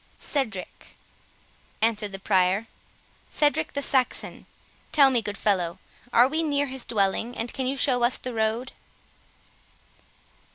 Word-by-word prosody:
"Cedric," 220 -10 -4 0.8
answered 215 -2 0
the 195 - -5
Prior; 190 +1 +2 0.6
"Cedric 290 - +1
the 280 - -2
Saxon.—Tell 270 +2 0
me, 245 -3 +2
good 205 -1 -5
fellow, 180 -5 0 0.3
are 245 +1 +6
we 310 +4 -1
near 285 -3 +1
his 265 -2 -5
dwelling, 220 +2 0
and 230 +1 -4
can 260 -1 -2
you 275 +1 -2
show 255 -2 +2
us 240 +1 +2
the 255 - -6
road?" 225 +3 -1
235 Hz, 125 wpm, -25 LUFS, 205-265 Hz, 0.8 s, are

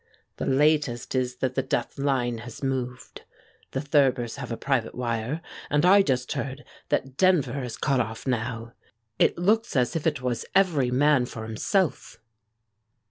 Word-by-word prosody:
"The - - -3
latest 140 -3 +2
is 125 -1 0
that 130 0 -2
The 135 - +1
Death 120 +1 -3
Line 125 -4 0
has 120 +3 -10
moved. 130 -2 -3 0.5
The 135 - -3
Thurbers 135 -4 +2
have 130 -4 -6
a 115 - -3
private 135 -5 -1
wire, 120 +5 -2 0.3
and 145 +3 +2
I 200 +2 +7
just 130 -8 0
heard 135 +1 -4 0.3
that 135 0 -1
Denver 180 -7 +3
is 125 -2 -5
cut 135 -2 +1
off 110 -2 -3
now! 115 -2 -3 0.5
It - - +3
looks 215 +5 +1
as 125 0 +1
if 165 0 0
it 150 -4 0
was 125 -2 -1
every 160 -10 +3
man 135 0 +3
for 115 -3 -7
himself." 145 - -1
130 Hz, 160 wpm, -26 LUFS, 120-145 Hz, 0.5 s, I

